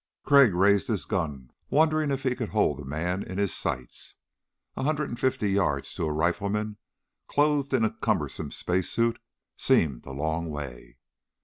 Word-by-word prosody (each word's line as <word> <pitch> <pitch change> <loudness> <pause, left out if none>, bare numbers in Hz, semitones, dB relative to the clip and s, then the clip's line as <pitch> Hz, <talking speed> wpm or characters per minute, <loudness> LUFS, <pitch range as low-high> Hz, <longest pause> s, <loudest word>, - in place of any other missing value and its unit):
Crag 140 -9 +6
raised 100 +5 +4
his 105 - 0
gun, 70 -7 -3 0.2
wondering 155 0 +3
if 140 0 -2
he 130 -2 +1
could 120 -4 -4
hold 90 -10 +1
the 75 - -7
man 85 +7 -2
in 95 -1 -6
his 100 -2 +1
sights. 65 -1 -4 0.6
A - - -4
hundred 150 +1 0
and 120 - -6
fifty 105 -6 +1
yards 95 -8 0
to - - -2
a - - -1
rifleman 100 +7 -1 0.5
clothed 145 -1 +2
in 125 -4 +3
a 110 - -1
cumbersome - - -1
space 90 0 0
suit 115 0 +1 0.4
seemed 70 -7 +2
a - - -6
long 80 +4 -2
way. 65 -5 -7
100 Hz, 170 wpm, -27 LUFS, 75-130 Hz, 0.6 s, Crag